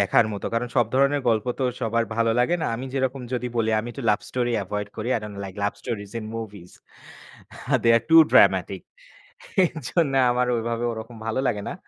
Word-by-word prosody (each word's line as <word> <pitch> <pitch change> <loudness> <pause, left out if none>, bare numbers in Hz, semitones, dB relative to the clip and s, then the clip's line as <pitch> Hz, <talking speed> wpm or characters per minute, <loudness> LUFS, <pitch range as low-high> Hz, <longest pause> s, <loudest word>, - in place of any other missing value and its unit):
দেখার 100 +3 +4
মত। 100 - -6
কারণ 120 +1 -1
সব 120 -3 +4
ধরণের 140 +1 +3
গল্প 110 -1 +1
তো - - +1 0.2
সবার 115 -1 0
ভালো 115 0 +2
লাগে 150 +8 +2
না। - - 0
আমি 130 +3 -6
যেরকম 130 0 -1
যদি 125 0 -2
বলি 110 -1 +1
আমি 115 - -7
একটু 140 - -8
লাভ 105 - +1
স্টোরি 120 -1 -1
এভয়েড 105 +2 -4
করি, 110 +2 -4
I - - -3
don't 105 -1 -8
like 95 -1 -8
love 100 - 0
stories 105 -5 -5
in - - -8
movies. 100 -6 -8 1.1
They 115 - +2
R 115 - 0
two 165 - +7 0.2
dramatic - - +4 0.8
এরজন্য 160 -2 -1 0.2
আমার 125 0 +1
ওভাবে 115 +1 -2
ওরকম 115 +1 -8
ভালো 115 +3 -1
লাগে 105 - -2
না। - - -4
115 Hz, 195 wpm, -24 LUFS, 110-125 Hz, 1.1 s, two